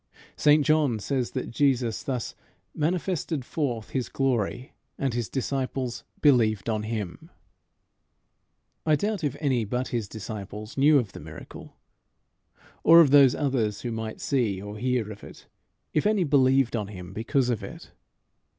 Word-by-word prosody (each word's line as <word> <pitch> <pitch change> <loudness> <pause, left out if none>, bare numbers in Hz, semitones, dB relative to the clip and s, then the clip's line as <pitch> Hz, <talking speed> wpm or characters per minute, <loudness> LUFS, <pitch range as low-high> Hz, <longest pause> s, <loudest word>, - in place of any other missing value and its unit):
St 150 -1 +4
John 155 -6 +3
says 125 +3 -2
that 130 - -4
Jesus 125 -4 +1
thus 125 -4 -3 0.4
"manifested 165 -3 -1
forth 125 -9 -3
his 130 -3 -2
glory, 125 -2 -1 0.2
and 135 -3 -1
his 120 -2 -2
disciples 130 -2 -3 0.2
believed 115 -8 +3
on 110 -2 0
him." 105 -4 -5 1.5
I 155 -1 +3
doubt 205 +3 -2
if 140 -2 -1
any 130 -6 +1
but 125 +5 -2
his 115 -4 -2
disciples 105 0 -7
knew 145 +2 +5
of 120 -7 -1
the - - -10
miracle; - - -11 1.1
or 165 +1 +8
of 155 -5 +6
those 140 -3 +7
others 120 -8 -1
who 120 - -3
might 110 -1 -5
see 115 -9 0
or 105 +2 -8
hear 125 -3 0
of 105 - -11
it, - - -12 0.5
if 155 - +2
any 210 -3 +2
believed 135 -4 +3
on 105 -3 -2
him 90 -2 -9
because 125 +4 0
of 115 - -2
it. - - -10
125 Hz, 150 wpm, -26 LUFS, 110-140 Hz, 1.5 s, or